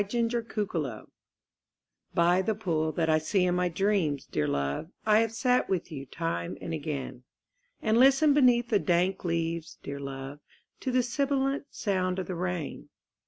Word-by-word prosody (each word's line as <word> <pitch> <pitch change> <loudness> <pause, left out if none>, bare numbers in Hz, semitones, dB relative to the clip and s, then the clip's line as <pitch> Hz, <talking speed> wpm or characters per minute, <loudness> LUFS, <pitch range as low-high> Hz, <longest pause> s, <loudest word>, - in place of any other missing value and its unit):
THE 230 +2 -1 0.2
POOL 145 - -4 1.1
By 175 +2 +4
the 215 +3 0
pool 160 -7 -1
that 165 0 0
I 155 0 +4
see 180 +4 +1
in 180 - +2
my 180 0 +1
dreams, 175 -6 0
dear 75 - -1
love, 70 - -2 0.2
I 215 0 +5
have 225 -1 +1
sat 250 +2 +1
with 180 -2 -1
you 140 -3 -7
time 145 - -3
and 165 - -5
again; 140 -5 -4 0.6
And 220 +1 +3
listened 275 +3 +6
beneath 245 -4 +4
the 210 - +3
dank 180 +1 +1
leaves, 165 -1 -2
dear 140 0 -5
love, 135 +1 -6 0.4
To - - -3
the 250 0 +3
sibilant 275 +2 0
sound 185 -3 -1
of 190 - -2
the 185 - -4
rain. 175 -3 -4
180 Hz, 165 wpm, -28 LUFS, 155-225 Hz, 1.1 s, listened